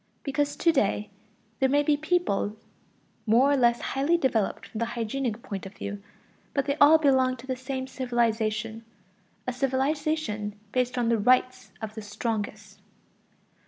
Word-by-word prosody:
Because 285 Hz, +1 st, -1 dB
to 335 Hz, -, +3 dB
day 210 Hz, -7 st, 0 dB, 0.5 s
there 265 Hz, -, +3 dB
may 290 Hz, +2 st, +3 dB
be 295 Hz, 0 st, +3 dB
peoples 310 Hz, -, 0 dB, 0.7 s
more 245 Hz, +6 st, +5 dB
or -, -, +4 dB
less 240 Hz, -3 st, +3 dB
highly 285 Hz, +6 st, +2 dB
developed 240 Hz, -, 0 dB
from 220 Hz, -, -7 dB
the 230 Hz, -, +1 dB
hygienic 235 Hz, 0 st, -2 dB
point 195 Hz, -1 st, -5 dB
of 195 Hz, -, -13 dB
view, 200 Hz, 0 st, -6 dB, 0.5 s
but 275 Hz, -2 st, +1 dB
they 280 Hz, -, 0 dB
all 305 Hz, +2 st, +8 dB
belong 260 Hz, -4 st, +3 dB
to 240 Hz, -, -12 dB
the 260 Hz, -1 st, -2 dB
same 260 Hz, +1 st, -4 dB
civilization 230 Hz, -4 st, -1 dB, 0.6 s
a 250 Hz, -, -2 dB
civilization 265 Hz, -4 st, -1 dB, 0.2 s
based 250 Hz, 0 st, 0 dB
on 240 Hz, -2 st, +1 dB
the 230 Hz, -1 st, +2 dB
right 255 Hz, +1 st, +2 dB
of 215 Hz, -1 st, -4 dB
the 220 Hz, -, -7 dB
strongest. 210 Hz, +1 st, -4 dB
255 Hz, 155 wpm, -27 LUFS, 220-275 Hz, 0.7 s, all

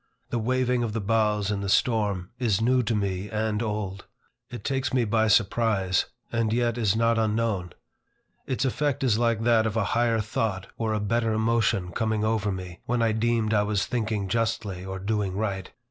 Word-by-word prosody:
The 120 Hz, -, 0 dB
waving 125 Hz, +1 st, +1 dB
of 115 Hz, -3 st, -2 dB
the 115 Hz, -, -1 dB
boughs 105 Hz, -1 st, +1 dB
in 100 Hz, -1 st, -2 dB
the 100 Hz, -, -3 dB
storm, 105 Hz, -6 st, +1 dB
is 110 Hz, -6 st, +1 dB
new 125 Hz, +3 st, +3 dB
to 115 Hz, -1 st, -1 dB
me 100 Hz, -1 st, -2 dB
and 110 Hz, 0 st, -1 dB
old. 105 Hz, -4 st, -3 dB, 0.4 s
It 120 Hz, -, -8 dB
takes 135 Hz, -1 st, -1 dB
me 125 Hz, -2 st, +2 dB
by 110 Hz, +1 st, +2 dB
surprise, 105 Hz, -3 st, +2 dB, 0.2 s
and 115 Hz, -2 st, 0 dB
yet 120 Hz, 0 st, +1 dB
is 110 Hz, -4 st, +1 dB
not 115 Hz, 0 st, +2 dB
unknown. 110 Hz, -5 st, 0 dB, 0.7 s
Its 130 Hz, +1 st, -1 dB
effect 140 Hz, +1 st, 0 dB
is 115 Hz, -4 st, +2 dB
like 115 Hz, -2 st, +1 dB
that 115 Hz, -1 st, +4 dB
of 110 Hz, +1 st, -2 dB
a 115 Hz, -, +2 dB
higher 115 Hz, -1 st, +2 dB
thought 105 Hz, -3 st, -2 dB
or 110 Hz, -1 st, -1 dB
a -, -, 0 dB
better 115 Hz, +2 st, 0 dB
emotion 110 Hz, -5 st, +1 dB
coming 110 Hz, +1 st, -1 dB
over 110 Hz, -2 st, +1 dB
me, 90 Hz, -2 st, -6 dB
when 120 Hz, 0 st, +1 dB
I 115 Hz, -, +3 dB
deemed 110 Hz, 0 st, +1 dB
I 105 Hz, -, +4 dB
was 105 Hz, -1 st, 0 dB
thinking 110 Hz, -4 st, -2 dB
justly 110 Hz, -4 st, -1 dB
or 95 Hz, 0 st, -5 dB
doing 100 Hz, -1 st, -2 dB
right. 100 Hz, -3 st, -2 dB
110 Hz, 190 wpm, -26 LUFS, 100-115 Hz, 0.7 s, that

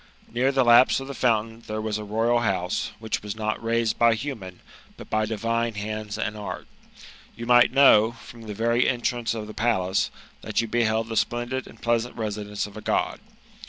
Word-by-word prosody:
Near 130 Hz, +3 st, +2 dB
the 135 Hz, -1 st, +3 dB
lapse 120 Hz, +3 st, +6 dB
of 135 Hz, -, -6 dB
the 140 Hz, -, -5 dB
fountain 115 Hz, -3 st, 0 dB
there 110 Hz, 0 st, -3 dB
was 110 Hz, -1 st, -2 dB
a -, -, -5 dB
royal 115 Hz, +3 st, +1 dB
house, 95 Hz, -6 st, -1 dB
which 110 Hz, 0 st, -3 dB
was 105 Hz, 0 st, -5 dB
aot 110 Hz, -1 st, -2 dB
raised 115 Hz, -1 st, 0 dB
by 115 Hz, -1 st, +5 dB
humani 110 Hz, -8 st, -6 dB, 0.4 s
but -, -, -12 dB
by 110 Hz, 0 st, +1 dB
divine 115 Hz, +1 st, -1 dB
hand3 110 Hz, +1 st, -4 dB, 0.3 s
apd 105 Hz, -1 st, -5 dB
act. -, -, -17 dB, 0.7 s
You 115 Hz, -, -6 dB
might 120 Hz, 0 st, +6 dB
kaow, 120 Hz, -4 st, +5 dB
from 115 Hz, -1 st, -12 dB
(he 105 Hz, -, -4 dB
very 115 Hz, +3 st, +2 dB
entrance 120 Hz, -1 st, -1 dB
of 110 Hz, -1 st, -4 dB
the 110 Hz, -, -9 dB
.pa]ace, 105 Hz, -5 st, +1 dB, 0.3 s
that -, -, -2 dB
you 115 Hz, -, 0 dB
liehild 110 Hz, -1 st, +1 dB
the 115 Hz, -, -5 dB
splendid 120 Hz, +4 st, -1 dB
and 115 Hz, -, -15 dB
pleasant 120 Hz, +1 st, 0 dB
residence 105 Hz, -2 st, -3 dB
of 105 Hz, -, -11 dB
a 110 Hz, -, -7 dB
Gpd. -, -, -1 dB
115 Hz, 195 wpm, -25 LUFS, 110-120 Hz, 0.7 s, lapse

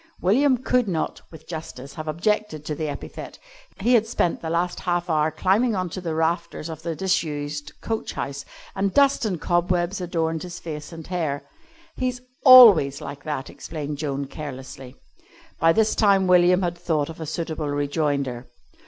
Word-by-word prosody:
William 255 Hz, +8 st, +3 dB
could 250 Hz, -1 st, +1 dB
not, 165 Hz, -5 st, -2 dB
with 160 Hz, -1 st, -14 dB
justice, 150 Hz, -5 st, -7 dB
have 155 Hz, 0 st, -7 dB
objected 170 Hz, -1 st, -1 dB
to 150 Hz, -, -2 dB
the 155 Hz, +1 st, -3 dB
epithet. 140 Hz, -, -8 dB, 0.4 s
He 240 Hz, +5 st, +3 dB
had 225 Hz, -2 st, +4 dB
spent 180 Hz, -6 st, 0 dB
the 160 Hz, -, -4 dB
last 175 Hz, +2 st, -1 dB
half 175 Hz, -1 st, -1 dB
hour 155 Hz, 0 st, +2 dB
climbing 210 Hz, +8 st, +1 dB
on 185 Hz, -2 st, -2 dB
to 185 Hz, -, -5 dB
the 165 Hz, -3 st, -3 dB
rafters 165 Hz, 0 st, -1 dB
of 160 Hz, -1 st, -7 dB
the 165 Hz, -1 st, -3 dB
disused 150 Hz, -5 st, -2 dB
coach 225 Hz, -1 st, -3 dB
house, 140 Hz, 0 st, -4 dB, 0.3 s
and 195 Hz, 0 st, -1 dB
dust 280 Hz, -3 st, +4 dB
and 185 Hz, -6 st, -2 dB
cobwebs 175 Hz, +2 st, 0 dB
adorned 165 Hz, -2 st, -1 dB
his 175 Hz, -1 st, -7 dB
face 150 Hz, -1 st, -7 dB
and 165 Hz, -2 st, -9 dB
hair. 160 Hz, -6 st, -2 dB, 0.5 s
"He's 250 Hz, -1 st, -1 dB, 0.2 s
always 220 Hz, -, +9 dB
like 140 Hz, -1 st, -8 dB
that," 150 Hz, -3 st, -3 dB
explained 150 Hz, -2 st, -6 dB
Joan, 140 Hz, -2 st, -2 dB
carelessly. 135 Hz, -2 st, -8 dB, 0.6 s
By 165 Hz, +1 st, +5 dB
this 220 Hz, +4 st, +2 dB
time 200 Hz, -3 st, +3 dB
William 180 Hz, 0 st, +5 dB
had 175 Hz, -1 st, -2 dB
thought 155 Hz, -4 st, -1 dB
of 165 Hz, 0 st, -9 dB
a 160 Hz, -, -5 dB
suitable 160 Hz, -1 st, -3 dB
rejoinder. 145 Hz, -3 st, -1 dB
165 Hz, 170 wpm, -24 LUFS, 150-185 Hz, 0.6 s, always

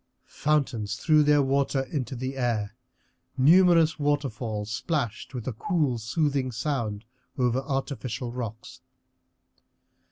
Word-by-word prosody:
Fountains 135 Hz, -9 st, -1 dB
threw 155 Hz, +2 st, +4 dB
their 145 Hz, -1 st, +4 dB
water 135 Hz, 0 st, +1 dB
into 130 Hz, -2 st, -4 dB
the 130 Hz, +2 st, -4 dB
air, 115 Hz, -5 st, -1 dB, 0.6 s
numerous 165 Hz, +2 st, +5 dB
waterfalls 120 Hz, -8 st, -1 dB
splashed 125 Hz, -2 st, -3 dB
with 120 Hz, -1 st, -5 dB
a 130 Hz, -, -1 dB
cool, 140 Hz, -, 0 dB
soothing 135 Hz, +2 st, 0 dB
sound 115 Hz, -4 st, -3 dB, 0.3 s
over 125 Hz, -1 st, +2 dB
artificial 135 Hz, -3 st, -3 dB
rocks. 115 Hz, -3 st, -7 dB
130 Hz, 105 wpm, -26 LUFS, 115-145 Hz, 0.6 s, numerous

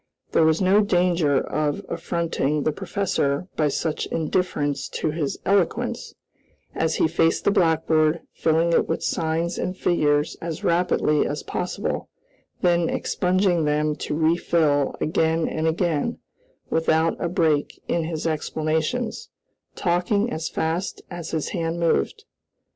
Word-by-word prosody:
There -, -, +3 dB
was 160 Hz, +3 st, +3 dB
no 195 Hz, +3 st, +5 dB
danger 175 Hz, -7 st, +2 dB
of 150 Hz, -1 st, -2 dB
affronting 155 Hz, -4 st, -1 dB
the 155 Hz, -, +1 dB
professor 170 Hz, -3 st, -1 dB
by 155 Hz, -, +2 dB
such 150 Hz, +2 st, -2 dB
indifference 145 Hz, -5 st, -1 dB
to 155 Hz, -, -2 dB
his 150 Hz, -3 st, -2 dB
eloquence, 195 Hz, -3 st, 0 dB, 0.6 s
as 160 Hz, 0 st, 0 dB
he -, -, +3 dB
faced 165 Hz, 0 st, +1 dB
the -, -, +3 dB
blackboard, 160 Hz, -2 st, +2 dB
filling 165 Hz, +1 st, +2 dB
it -, -, +3 dB
with 165 Hz, -, -1 dB
signs 165 Hz, +2 st, -1 dB
and 185 Hz, +1 st, -3 dB
figures 150 Hz, -5 st, +1 dB
as 165 Hz, -1 st, -5 dB
rapidly 170 Hz, -3 st, +2 dB
as 145 Hz, 0 st, -4 dB
possible; 180 Hz, -, -3 dB, 0.5 s
then 175 Hz, -2 st, +3 dB
expunging 180 Hz, -2 st, +1 dB
them 150 Hz, 0 st, +1 dB
to -, -, -3 dB
refill 160 Hz, -3 st, +2 dB
again 160 Hz, +1 st, +1 dB
and 160 Hz, +1 st, -1 dB
again, 165 Hz, +4 st, 0 dB, 0.5 s
without 160 Hz, 0 st, +2 dB
a 170 Hz, -, 0 dB
break 160 Hz, -4 st, +1 dB
in 170 Hz, -1 st, 0 dB
his 160 Hz, -1 st, -4 dB
explanations; 160 Hz, +8 st, -1 dB, 0.5 s
talking 200 Hz, +5 st, +1 dB
as 160 Hz, +1 st, -3 dB
fast 165 Hz, +4 st, -2 dB
as 175 Hz, -2 st, -6 dB
his 160 Hz, -2 st, -2 dB
hand 165 Hz, -2 st, -2 dB
moved. 295 Hz, -, 0 dB
165 Hz, 130 wpm, -24 LUFS, 155-175 Hz, 0.6 s, no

